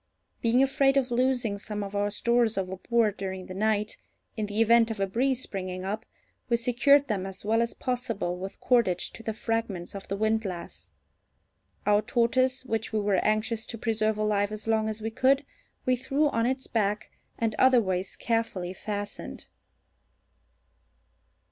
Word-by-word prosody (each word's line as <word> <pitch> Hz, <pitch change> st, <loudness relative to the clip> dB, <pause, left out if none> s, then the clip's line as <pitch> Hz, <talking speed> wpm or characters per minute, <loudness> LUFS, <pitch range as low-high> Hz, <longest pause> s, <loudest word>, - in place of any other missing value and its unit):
Being 240 Hz, +3 st, +4 dB
afraid 270 Hz, 0 st, +3 dB
of 260 Hz, -2 st, +1 dB
losing 240 Hz, -4 st, +1 dB
some 210 Hz, 0 st, -4 dB
of 200 Hz, 0 st, -6 dB
our 205 Hz, 0 st, +1 dB
stores 235 Hz, +1 st, +1 dB
overboard 195 Hz, +3 st, 0 dB
during 190 Hz, -1 st, -4 dB
the 185 Hz, -, -8 dB
night, 210 Hz, +2 st, 0 dB, 0.4 s
in 215 Hz, -2 st, -2 dB
the 205 Hz, +1 st, -3 dB
event 230 Hz, 0 st, +5 dB
of 220 Hz, -2 st, -4 dB
a 195 Hz, -, +2 dB
breeze 255 Hz, +6 st, 0 dB
springing 185 Hz, -1 st, -5 dB
up, 215 Hz, +4 st, -4 dB, 0.4 s
we 235 Hz, -, +3 dB
secured 270 Hz, +4 st, +4 dB
them 195 Hz, -5 st, -1 dB
as 195 Hz, +1 st, -7 dB
well 225 Hz, +2 st, +3 dB
as 235 Hz, -, -1 dB
possible 240 Hz, -8 st, -2 dB
with 190 Hz, +2 st, -7 dB
cordage 220 Hz, -8 st, +2 dB
to -, -, -10 dB
the 225 Hz, -, -3 dB
fragments 220 Hz, -6 st, -2 dB
of 195 Hz, -1 st, -8 dB
the 195 Hz, -, -2 dB
windlass. 215 Hz, -4 st, -2 dB, 1.0 s
Our 210 Hz, 0 st, +4 dB
tortoise, 255 Hz, +3 st, +1 dB
which 225 Hz, -2 st, -2 dB
we 220 Hz, -, +1 dB
were 200 Hz, -2 st, +1 dB
anxious 215 Hz, +1 st, 0 dB
to 230 Hz, -, -6 dB
preserve 220 Hz, -1 st, 0 dB
alive 210 Hz, -1 st, +1 dB
as 215 Hz, +1 st, -6 dB
long 220 Hz, -1 st, +2 dB
as 215 Hz, 0 st, -5 dB
we 225 Hz, -, -2 dB
could, 275 Hz, +4 st, +3 dB, 0.4 s
we 255 Hz, -, +3 dB
threw 275 Hz, +4 st, +1 dB
on 230 Hz, -3 st, +1 dB
its 260 Hz, +1 st, -1 dB
back, 210 Hz, -2 st, -1 dB, 0.3 s
and 225 Hz, -1 st, 0 dB
otherwise 200 Hz, -8 st, +3 dB
carefully 225 Hz, -6 st, -1 dB
fastened. 205 Hz, +1 st, -6 dB
220 Hz, 160 wpm, -28 LUFS, 200-240 Hz, 1.0 s, event